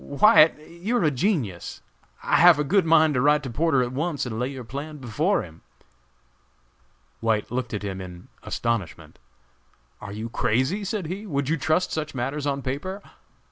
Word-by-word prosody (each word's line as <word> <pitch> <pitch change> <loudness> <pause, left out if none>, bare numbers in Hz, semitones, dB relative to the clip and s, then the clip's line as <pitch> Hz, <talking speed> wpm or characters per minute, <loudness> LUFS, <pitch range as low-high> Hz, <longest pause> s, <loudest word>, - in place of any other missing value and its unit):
"White, 160 +2 +5
you're 185 +7 -2
a 155 - +3
genius! 135 - -2 0.4
I - - +2
have 175 -1 +7
a 150 - +1
good 180 +3 +2
mind 160 -1 +5
to 125 - +1
write 150 +2 +3
to 130 - -5
Porter 140 0 +2
at 120 - -4
once 145 +1 -2
and 115 -2 -4
lay 125 - 0
your 135 -2 -7
plan 140 +6 -7
before 145 - 0
him." 80 -1 -13 1.6
White 110 -2 0
looked 125 0 -3
at 105 -2 -4
him 95 -2 -4
in 90 -1 -10
astonishment. 115 -7 -3 0.8
"Are 100 - -7
you 110 +3 -5
crazy?" 130 - 0
said 200 -1 -3
he; 195 +6 -6
"would 140 -5 -2
you 165 - +2
trust 160 +4 0
such 150 -2 -4
matters 135 +4 -2
on 140 -1 -2
paper? 170 +10 -4
140 Hz, 175 wpm, -24 LUFS, 120-165 Hz, 1.6 s, have